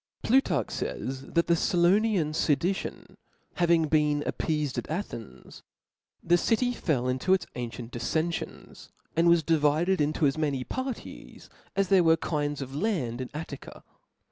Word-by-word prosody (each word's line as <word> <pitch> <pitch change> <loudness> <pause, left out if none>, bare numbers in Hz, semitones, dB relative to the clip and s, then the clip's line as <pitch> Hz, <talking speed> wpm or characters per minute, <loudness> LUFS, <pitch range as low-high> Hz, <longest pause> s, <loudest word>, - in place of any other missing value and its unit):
Plutarch 190 - +2
fays" 130 0 -4
(^), - - -13
that 170 - +4
the 170 - +3
Cilonian 175 -1 +2
fedition 165 +6 -1 0.4
hav 175 -2 +2
0)L»fcof - - +5
ing 165 -2 +4
been 150 -1 +2
appeafed 150 -4 -1
at - - -8
Athens, 155 - -6 0.6
the 175 +1 +3
city 245 +5 +1
fell 135 - -1
into 130 +9 +2
its 190 - -4
ancient 120 -1 -6
diflenfionsj 160 +8 -3 0.3
and 170 +1 +4
was 170 -1 +5
divided 160 +3 +2
into 150 +2 +1
as 140 +2 +1
many 140 -4 0
parties 260 - -7 0.2
as 195 -2 +1
there 190 -2 +5
were 165 0 +5
kinds 145 -3 -2
of 135 +1 -9
land 145 - -1
in 125 - -5
Attica. 150 -3 -8
160 Hz, 150 wpm, -28 LUFS, 140-175 Hz, 0.6 s, 0)L»fcof